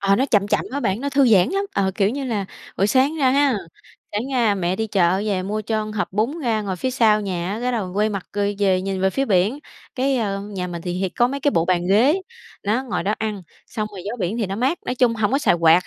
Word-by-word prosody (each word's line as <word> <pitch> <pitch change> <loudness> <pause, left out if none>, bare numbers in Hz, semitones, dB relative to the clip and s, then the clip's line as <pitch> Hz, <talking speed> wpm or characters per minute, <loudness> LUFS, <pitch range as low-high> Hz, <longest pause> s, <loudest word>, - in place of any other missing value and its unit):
Ờ, 195 0 +3
nó 265 +3 +1
chậm 205 -4 +2
chậm - - +1
á 280 +2 -3
bạn, 195 +1 -1
nó 280 - -2
thư 275 -1 +4
giãn 195 -6 +5
lắm. 395 +1 0
Ờ, 190 -1 +1
kiểu 200 -1 +2
như 275 +3 -4
là, 215 -6 -2 0.3
buổi 195 - +2
sáng 265 +7 +2
ra 265 -4 +3
ha, 280 -2 +3 0.6
sáng 210 +2 -1
ra 230 -5 +3
mẹ 185 0 -1
đi 220 - -1
chợ 185 -3 +2
về 195 -3 0
mua 210 +3 -2
cho 215 0 -1
hộp 215 -2 -3
bún 230 - 0
ra 225 -5 0
ngồi 190 -2 -3
phía 260 +7 -2
sau 220 -4 +3
nhà 185 -2 -3
á, 215 - -4
cái 250 +1 -1
đầu 195 -6 -2
quay 210 +1 +2
mặt, 200 -3 -5
ơ, 205 - -1 0.2
về 190 -2 +2
nhìn 195 -1 -3
về 190 - +2
phía 270 +7 0
biển. 205 +4 +2 0.4
Cái, 270 0 +1
ơ, 200 -4 -1
nhà 200 -3 -5
mình 170 -2 -6
thì 175 - -3
hì 185 +1 -1
có 240 +6 +1
mấy 275 +2 -4
cái 285 - +2
bộ 165 - +1
bàn 175 0 +1
ghế, 265 - +4 0.4
nó, 220 +6 +1
ngồi 195 -10 -2
đó 205 +4 0
ăn, 215 -3 -3 0.2
xong 215 -1 -4
rồi 195 -3 -9
gió 220 +4 -3
biển 195 +5 -1
thì 220 - 0
nó 195 +1 -4
mát, 265 +9 0
nói 250 - -1
chung 245 -2 +3
hổng 220 +1 0
có 275 - +3
xài 290 - +3
quạt 165 +1 +4
210 Hz, 275 wpm, -22 LUFS, 190-250 Hz, 0.6 s, giãn